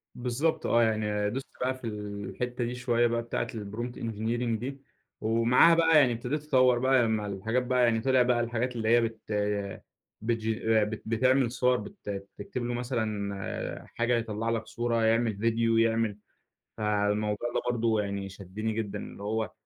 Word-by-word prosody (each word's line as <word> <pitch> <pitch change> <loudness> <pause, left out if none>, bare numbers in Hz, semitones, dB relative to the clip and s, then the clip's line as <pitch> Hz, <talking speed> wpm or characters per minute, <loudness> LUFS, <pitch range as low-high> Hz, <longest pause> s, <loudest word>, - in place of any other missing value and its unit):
بالضبط 125 +6 -1
آه. 120 0 +4
يعني 105 -2 0
دوست 135 +5 -4
بقى 130 +1 +1
في 130 -2 -7
الحتة 105 +4 -4
دي 120 +1 -3
شوية 120 -1 +2
بقى 115 0 0
بتاعة 115 - -2
prompt 115 +3 -5
engineering 115 +1 -1
دي 135 +3 -6 0.4
ومعاها 115 +8 +5
بقى 165 -1 +5
يعني 130 -4 +4
ابتديت 140 +6 -3
أطوَّر 130 -4 +4
بقى 130 0 +4
لما 110 -2 0
الحاجات 110 +6 -1
بقى 125 0 +2
يعني 115 -2 +3
طِلع 130 +1 +3
بقى 125 -1 +3
الحاجات 120 +1 -1
اللي 110 -2 -1
هي 120 +1 +6
بت 115 -1 -2 1.0
بتجين 110 -1 +1
ب 110 +1 -5
بتعمل 130 +2 +2
صور 125 0 +2
بت 195 - -9 0.3
بتكتب 120 +4 -5
له 120 - -2
مثلًا 110 -5 -3
حاجة 120 +1 +2
يطلَّع 115 0 -2
لك 115 -1 -1
صورة، 120 -1 0
يعمل 115 -1 +2
فيديو، 115 +1 +2
يعمل 115 -2 +2 0.6
فالموضوع 105 +1 0
ده - - 0
برضو 115 -2 +1
يعني 100 -1 -3
شدني 100 +3 -5
جدًا 110 -2 -3
اللي 100 - -9
هو، 110 -1 -1
115 Hz, 160 wpm, -28 LUFS, 110-125 Hz, 1.0 s, هي